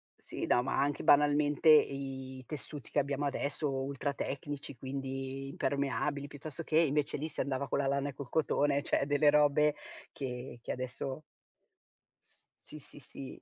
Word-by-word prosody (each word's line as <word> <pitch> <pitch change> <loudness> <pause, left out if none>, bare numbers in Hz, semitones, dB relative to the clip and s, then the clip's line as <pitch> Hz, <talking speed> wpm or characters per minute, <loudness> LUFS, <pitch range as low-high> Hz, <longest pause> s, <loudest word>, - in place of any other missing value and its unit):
Sì, - - -5
no, 120 - +3
ma 135 - 0
anche 145 +1 0
banalmente 145 +1 +4
i 135 -3 +3
tessuti 150 -1 -7
che - - +2
abbiamo 140 +1 -1
adesso, 145 +1 -1
ultra 135 +1 -2
tecnici, 140 -1 -5
quindi 135 0 -4
impermeabili, 140 +1 -1
piuttosto 145 +3 -7
che 155 - +1
invece 150 -2 +2
lì, 155 +3 -3
si 150 - -3
andava 140 0 -1
con - - 0
la 135 - +1
lana 140 +1 0
e - - -7
col 135 -2 -8
cotone, 145 -2 +2
cioè - - +1
delle 145 +1 +4
robe 150 0 +4 0.4
che 125 -2 -5
che - - -4
adesso 130 +3 -4 1.0
S - - -16
si, 150 - -11
si, 145 - -10
si 135 0 -9
140 Hz, 160 wpm, -32 LUFS, 135-145 Hz, 1.0 s, banalmente